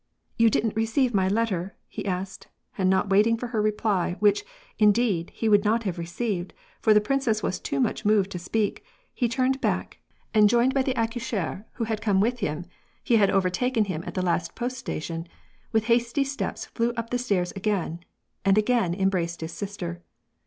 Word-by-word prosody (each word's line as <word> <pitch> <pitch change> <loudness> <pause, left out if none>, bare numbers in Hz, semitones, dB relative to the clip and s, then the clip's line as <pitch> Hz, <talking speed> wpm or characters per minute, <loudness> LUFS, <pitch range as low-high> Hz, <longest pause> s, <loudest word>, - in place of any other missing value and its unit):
"You 230 0 +5
didn't 220 0 0
receive 225 +3 +1
my 190 -2 +2
letter?" 195 -3 -1
he - - -6
asked, 190 +1 -4 0.3
and 185 -1 +1
not 190 +1 +2
waiting 215 +4 +4
for 245 - -5
her 225 -2 0
reply, 210 -4 0
which, 210 - +3 0.4
indeed, 210 -5 +3
he 225 - -2
would 205 -2 +5
not 225 +2 +2
have 185 -4 -3
received, 175 +2 -3 0.3
for 220 - +4
the 210 - +7
princess 225 -1 0
was 185 - -1
too 140 - -3
much 135 - 0
moved 205 -2 +3
to 180 - -4
speak, 205 +4 -1 0.3
he 240 -3 0
turned 260 +3 +1
back, - - -1 0.3
and 210 -1 +6
joined 240 +3 +3
by 270 - +2
the 260 0 -1
accoucheur, 225 -4 -2
who 235 - -3
had 220 -1 -2
come 205 -3 +2
with 240 +5 +1
him 155 -2 -2 0.4
(he 235 - +3
had 200 -2 +4
overtaken 210 +5 +1
him 170 -4 -4
at - - -6
the 185 -1 0
last 170 -1 -1
post 250 +2 -3
station), 165 -7 -4 0.4
with 220 -1 +2
hasty 235 +4 +2
steps 275 +1 -4
flew 235 0 -1
up 230 0 -4
the 245 - 0
stairs 195 -7 0
again, 195 -4 -1 0.4
and 195 +1 +4
again 215 -5 +2
embraced 180 -4 0
his 160 +1 -4
sister. 175 -1 -5
210 Hz, 190 wpm, -26 LUFS, 185-230 Hz, 0.4 s, the